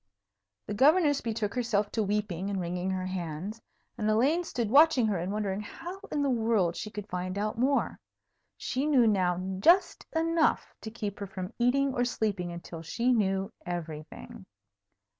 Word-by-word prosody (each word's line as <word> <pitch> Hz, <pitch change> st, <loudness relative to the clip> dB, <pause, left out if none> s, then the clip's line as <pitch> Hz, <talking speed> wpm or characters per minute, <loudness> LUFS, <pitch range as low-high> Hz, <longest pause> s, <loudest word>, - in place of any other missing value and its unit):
The 210 Hz, -, -4 dB
Governess 290 Hz, -, +4 dB
betook 220 Hz, -3 st, -2 dB
herself 210 Hz, -4 st, 0 dB
to 225 Hz, -, 0 dB
weeping 200 Hz, -3 st, -1 dB
and 195 Hz, -1 st, -2 dB
wringing 180 Hz, +1 st, -2 dB
her 185 Hz, -1 st, -2 dB
hands, 185 Hz, +3 st, -5 dB, 0.4 s
and 215 Hz, -1 st, +1 dB
Elaine 275 Hz, +11 st, +3 dB
stood 235 Hz, -9 st, -3 dB
watching 285 Hz, -3 st, +6 dB
her 205 Hz, -5 st, 0 dB
and 180 Hz, +3 st, -3 dB
wondering 205 Hz, -1 st, -2 dB
how 350 Hz, -, -8 dB
in 290 Hz, -1 st, 0 dB
the 280 Hz, -, +1 dB
world 220 Hz, -7 st, +1 dB
she 215 Hz, -, -5 dB
could 210 Hz, -1 st, -7 dB
find 185 Hz, 0 st, -4 dB
out 210 Hz, +1 st, -1 dB
more. 275 Hz, +3 st, +1 dB, 0.6 s
She 270 Hz, +3 st, -2 dB
knew 265 Hz, -6 st, +5 dB
now 185 Hz, -5 st, +2 dB, 0.2 s
just 350 Hz, -, +4 dB
enough 330 Hz, 0 st, +1 dB
to 220 Hz, -, -6 dB
keep 210 Hz, -3 st, -5 dB
her 200 Hz, -, -4 dB
from 185 Hz, +2 st, -6 dB
eating 270 Hz, +3 st, +2 dB
or 245 Hz, -, +1 dB
sleeping 205 Hz, -7 st, -1 dB
until 170 Hz, -1 st, -8 dB
she 235 Hz, +10 st, +1 dB
knew 195 Hz, -3 st, 0 dB
everything. 175 Hz, +6 st, -7 dB
210 Hz, 165 wpm, -29 LUFS, 185-250 Hz, 0.6 s, watching